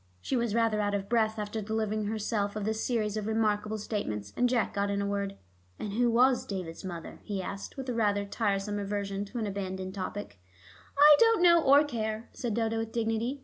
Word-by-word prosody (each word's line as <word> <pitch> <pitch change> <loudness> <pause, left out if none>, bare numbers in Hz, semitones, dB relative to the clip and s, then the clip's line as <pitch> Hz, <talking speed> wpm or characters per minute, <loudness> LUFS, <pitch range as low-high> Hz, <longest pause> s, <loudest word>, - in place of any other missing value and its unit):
She 175 - -2
was 235 -3 0
rather 225 -2 +2
out 205 0 0
of 200 -1 -3
breath 220 -1 +1
after 210 +1 -3
delivering 215 0 -1
herself 210 -1 -1
of 210 -1 -3
this 220 0 -1
series 220 -4 0
of 210 -1 -3
remarkable 215 -1 0
statements, 105 - -4
and 245 0 +2
Jack 240 -3 +1
got 200 0 0
in 200 0 0
a 200 - -1
word. 200 -1 -2 0.4
"And 205 - -5
who 240 +2 +2
was 250 +2 +4
David's 180 -4 -6
mother?" 175 -3 -7
he 200 -2 -4
asked, 195 +5 -6
with 265 -1 -5
a 250 - -1
rather 205 -3 +1
tiresome 205 -1 -1
reversion 200 0 -3
to 220 +5 -8
an 225 - -1
abandoned 190 -2 -4
topic. 190 - -6 0.6
"I 295 +1 +9
don't 455 -5 +5
know 340 -1 +7
or 285 0 +6
care," 220 -4 -3
said 235 -4 -3
Dodo 225 -1 0
with 225 0 -4
dignity. 230 +4 -1
215 Hz, 205 wpm, -29 LUFS, 200-230 Hz, 0.6 s, I